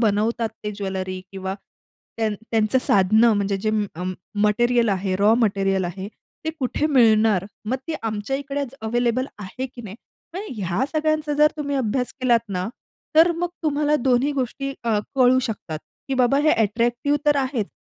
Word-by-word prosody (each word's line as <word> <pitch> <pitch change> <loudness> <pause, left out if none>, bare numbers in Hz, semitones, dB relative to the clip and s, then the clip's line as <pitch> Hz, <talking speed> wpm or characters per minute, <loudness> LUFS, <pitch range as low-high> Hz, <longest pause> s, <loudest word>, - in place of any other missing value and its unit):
बनवतात 225 +1 +1 0.2
ते 210 - -1
ज्वेलरी 190 -2 -4
किंवा 190 0 -4 0.6
त्यां 220 -1 0 0.2
त्यांचं 220 +2 +2
साधनं 215 +4 +5
म्हणजे 200 -1 0
जे 215 +3 -1 0.2
अं, 180 +2 -3 0.3
मटेरिअल 240 +2 +3
आहे, 190 -1 0
रॉ 210 +3 +4
मटेरिअल 195 -4 +1
आहे 190 +3 -5 0.4
ते 320 - 0
कुठे 265 +4 0
मिळणार? 220 - +4 0.2
मग 260 - +1
ते 320 - -1
आमच्या 220 +4 -2
इकडेच 275 -1 -4
अवेलेबल 240 +3 0
आहे, 230 +7 -5
की 245 -1 -12
नाही? 205 -2 -8 0.4
आणि 395 -5 -5
ह्या 185 +8 0
सगळ्यांचा 310 -1 0
जर 300 +1 +5
तुम्ही 285 -2 -2
अभ्यास 250 0 -1
केलात 235 -3 +2
ना, 185 +1 -2 0.5
तर 335 +2 +7
मग 345 +1 -2
तुम्हाला 300 0 +2
दोन्ही 260 +2 +2
गोष्टी 275 +1 -3
अ, 220 -3 +2 0.2
कळू 255 -1 +5
शकतात, 165 -7 -5 0.3
की 270 - 0
बाबा 255 +2 +3
हे - - +6
अट्रॅक्टिव्ह 235 +5 +1
तर 295 - +5
आहेच, 260 -6 -1
235 Hz, 160 wpm, -23 LUFS, 205-270 Hz, 0.6 s, तर